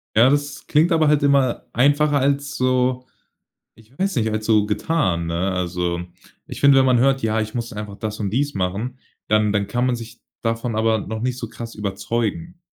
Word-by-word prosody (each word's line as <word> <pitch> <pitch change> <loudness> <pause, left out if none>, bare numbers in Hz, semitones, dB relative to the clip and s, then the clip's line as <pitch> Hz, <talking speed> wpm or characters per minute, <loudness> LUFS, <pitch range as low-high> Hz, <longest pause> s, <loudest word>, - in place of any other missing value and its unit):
Ja, 115 +4 +6
das 145 +1 -1
klingt 160 +4 +3
aber 160 -2 +3
halt 150 -1 +3
immer 140 -3 +2
einfacher 145 +3 +3
als 140 +1 0
so, 130 0 +1 0.7
ich 115 +4 -22
weiß 195 -3 -1
nicht, 110 -2 +1
als 110 0 -3
so 110 -2 +4
getan, 105 - 0
ne? 85 +3 -1
Also 90 -1 -2 0.5
ich - - -8
finde, 140 -1 +6
wenn 130 - +4
man 125 -2 +4
hört: 135 +2 +2
„Ja, 110 0 +1
ich 110 0 -4
muss 120 -1 -4
einfach 105 -1 -7
das 110 -1 -5
und 100 -2 -1
dies 140 +6 -1
machen“, 100 +7 -3 0.3
dann 105 -1 +3
dann 105 -1 0
kann 120 +5 -1
man 125 -1 +1
sich 115 0 -10 0.2
davon 115 0 -2
aber 110 0 +2
noch 110 +2 -5
nicht 125 +1 -1
so 115 - -5
krass 115 0 -8
überzeugen. 115 - -3
115 Hz, 200 wpm, -21 LUFS, 105-135 Hz, 0.7 s, Ja